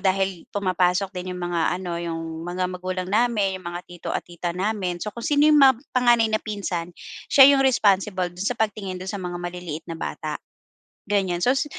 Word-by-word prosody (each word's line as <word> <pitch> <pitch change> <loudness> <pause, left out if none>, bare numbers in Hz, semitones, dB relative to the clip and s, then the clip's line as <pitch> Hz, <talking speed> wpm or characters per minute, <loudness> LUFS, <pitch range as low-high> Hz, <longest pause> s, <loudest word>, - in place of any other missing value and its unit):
dahil 190 -2 0
pumapasok 185 -1 +1
din 180 0 -5
'yong 180 - -7
mga 170 -1 0 0.2
ano, 175 -2 -4
'yong 165 -1 -5
mga 180 +1 -2
magulang 185 0 -4
namin, 210 -4 +1
'yong 185 - -13
mga 175 0 -5
tito 175 -1 -8
at - - -1
tita 175 0 -5
namin, 185 -2 -1
so 210 - -3
kung 235 - -8
sino 290 0 +3
'yong 300 - +6
mab 265 -2 +7 0.2
panganay 240 -3 +4
na 215 - +3
pinsan, 195 -5 -4 0.4
siya 270 - +8
'yong 275 - +3
responsible 195 -6 +2
do'n 180 +3 -5
sa 245 - -2
pagtingin 210 -4 -2
do'n 185 - -4
sa 200 - -4
mga 180 -1 -5
maliliit 175 -3 -6
na 170 - -7
bata, - - -4 0.7
ganyan. 190 -4 +1
So 250 +8 +3
s 270 - +1
185 Hz, 200 wpm, -24 LUFS, 175-210 Hz, 0.7 s, siya